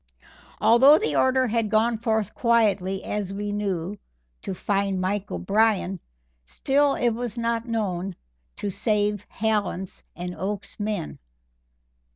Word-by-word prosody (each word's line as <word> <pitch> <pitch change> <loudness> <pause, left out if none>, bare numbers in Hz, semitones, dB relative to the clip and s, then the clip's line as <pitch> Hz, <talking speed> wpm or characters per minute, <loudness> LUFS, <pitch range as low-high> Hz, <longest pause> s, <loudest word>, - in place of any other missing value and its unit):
Although 265 +6 +7
the 440 - -1
order 260 0 +3
had 230 -2 0
gone 225 +1 +2
forth 220 -3 0
quietly, 205 -5 +1
as 200 -2 -3
we 205 0 -3
knew, 200 -2 -3 0.4
to 190 - -4
"find 195 0 0
Mike 195 +2 -1
O'Brien," 200 -3 +1 0.4
still 275 - +1
it 240 - +1
was 235 0 -4
not 230 0 -1
known 195 -5 -2 0.4
to - - -5
any 200 - -1
save 205 0 0
Hallen's 205 -4 -2
and 180 +1 -5
Oakes's 195 +4 -4
men. 205 -6 -3
210 Hz, 130 wpm, -25 LUFS, 195-230 Hz, 0.4 s, Although